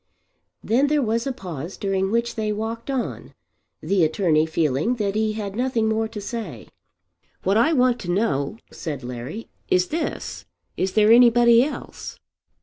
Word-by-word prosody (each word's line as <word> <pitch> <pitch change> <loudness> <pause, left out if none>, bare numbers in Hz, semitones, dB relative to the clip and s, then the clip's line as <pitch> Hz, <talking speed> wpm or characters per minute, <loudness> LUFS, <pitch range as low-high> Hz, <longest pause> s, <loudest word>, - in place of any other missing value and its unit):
Then 255 +6 +2
there 295 -1 +2
was 230 +2 0
a - - 0
pause 175 - -7
during 195 -1 0
which 235 +2 0
they 215 -1 -2
walked 225 +4 -4
on, 265 -3 -4 0.5
the 195 -3 +2
attorney 160 -1 +2
feeling 160 - 0
that 205 -4 -1
he 215 0 0
had 205 -2 -5
nothing 240 -2 0
more 220 0 0
to 220 -1 -7
say. 200 - -6 0.7
"What 195 +2 +2
I 235 +9 +4
want 250 -3 +3
to 175 - -7
know," 175 -4 0
said 145 -6 -6
Larry, 125 - -7 0.2
"is 180 0 +2
this. 320 0 -4 0.3
Is 185 0 -1
there 215 0 +5
anybody 235 0 +6
else?" 295 - -6
215 Hz, 155 wpm, -23 LUFS, 180-235 Hz, 0.7 s, anybody